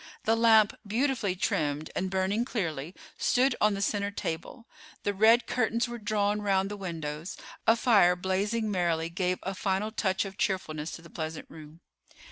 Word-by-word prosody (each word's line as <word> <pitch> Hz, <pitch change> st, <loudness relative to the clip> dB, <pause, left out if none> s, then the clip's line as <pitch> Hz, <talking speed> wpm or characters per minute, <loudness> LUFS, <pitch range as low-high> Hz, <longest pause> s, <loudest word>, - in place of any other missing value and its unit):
The 225 Hz, -, +3 dB
lamp, 220 Hz, -2 st, +5 dB
beautifully 230 Hz, -3 st, 0 dB
trimmed 150 Hz, -4 st, -1 dB
and 190 Hz, -, -1 dB
burning 190 Hz, +4 st, 0 dB
clearly, 170 Hz, -, -3 dB, 0.2 s
stood 255 Hz, +1 st, +3 dB
on 210 Hz, -1 st, +4 dB
the 195 Hz, -, -2 dB
center 200 Hz, -1 st, 0 dB
table, 200 Hz, +3 st, -5 dB, 0.4 s
the 205 Hz, -, 0 dB
red 225 Hz, +4 st, +5 dB
curtains 235 Hz, 0 st, 0 dB
were 240 Hz, 0 st, -6 dB
drawn 210 Hz, -1 st, 0 dB
round 195 Hz, -1 st, +1 dB
the -, -, -4 dB
windows; 165 Hz, -4 st, -5 dB, 0.3 s
a 225 Hz, -, +7 dB
fire, 205 Hz, -7 st, +4 dB
blazing 205 Hz, +5 st, -1 dB
merrily, 170 Hz, -3 st, 0 dB
gave 180 Hz, +1 st, 0 dB
a 195 Hz, -, -3 dB
final 195 Hz, +2 st, -1 dB
touch 190 Hz, -3 st, 0 dB
of 195 Hz, 0 st, -9 dB
cheerfulness 160 Hz, -5 st, -1 dB
to 165 Hz, -, -9 dB
the 170 Hz, -, -14 dB
pleasant 160 Hz, -1 st, -5 dB
room. 155 Hz, +1 st, -12 dB
195 Hz, 165 wpm, -29 LUFS, 170-220 Hz, 0.4 s, a